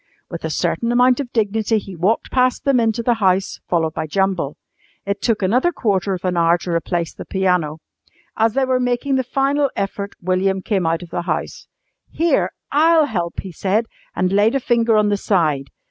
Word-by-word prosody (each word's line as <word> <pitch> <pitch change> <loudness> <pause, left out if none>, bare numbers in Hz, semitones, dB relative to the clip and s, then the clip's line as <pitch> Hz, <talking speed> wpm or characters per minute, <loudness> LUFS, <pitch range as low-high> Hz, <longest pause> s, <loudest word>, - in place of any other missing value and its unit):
With - - -6
a - - -2
certain 235 0 -1
amount 250 +1 +4
of 260 -4 -4
dignity 220 0 +1
he 195 -2 -6
walked 190 +7 0
past 255 0 +1
them 275 -3 +3
into 230 0 0
the 240 - +3
house 190 0 +1
followed 160 -3 +1
by 160 -1 -3
Jumble. 185 -3 -1 0.5
It 200 0 -2
took 225 -4 0
another 250 - +2
quarter 200 - 0
of 180 - -8
an 180 -1 0
hour 170 0 +3
to 175 - -6
replace 170 0 -1
the - - -8
piano. 180 -5 0 0.6
As 225 0 +2
they 270 +1 +2
were 255 -1 +1
making 245 +2 0
the 260 - +1
final 275 +2 +1
effort 200 0 -4
William 185 +1 0
came 190 -6 0
out 165 +2 0
of 170 - -13
the 175 - -2
house. - - -3 0.4
"Here, 335 +1 +1 0.2
I'll 315 +2 +4
help!" 175 -10 -3
he 190 - -8
said, 200 +7 0 0.3
and 180 +1 0
laid 210 +5 +3
a - - +2
finger 230 -3 +2
on 210 -1 +3
the 205 - +1
side. 155 -10 0
200 Hz, 195 wpm, -20 LUFS, 180-245 Hz, 0.6 s, amount